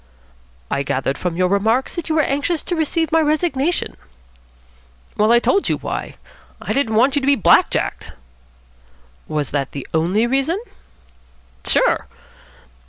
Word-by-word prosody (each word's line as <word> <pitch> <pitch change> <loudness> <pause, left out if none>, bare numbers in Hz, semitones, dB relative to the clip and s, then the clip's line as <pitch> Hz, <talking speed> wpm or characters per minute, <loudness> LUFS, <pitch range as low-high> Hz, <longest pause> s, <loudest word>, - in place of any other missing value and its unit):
"I 140 - 0
gathered 135 0 -1
from 180 -2 -2
your 185 0 +2
remarks 220 +7 +1
that 345 -1 -5
you 315 - +1
were 310 - +3
anxious 290 +4 -1
to 350 - -3
receive 320 0 -1
my 325 0 +4
resignation." 310 0 0 1.2
"Well, 215 +2 +3
I 240 - +7
told 390 +11 +1
you - - +1
why. - - -5 0.4
I - - -3
didn't 235 -6 0
want 260 +5 +3
you 285 - +1
be 280 +1 +3
black 215 - +4
jacked." - - -3 1.2
"Was 150 -3 -2
that 140 -2 -2
the 140 - -6
only 175 +8 +2
reason?" 275 +9 0 1.1
"Sure." - - +2
265 Hz, 145 wpm, -19 LUFS, -, 1.2 s, I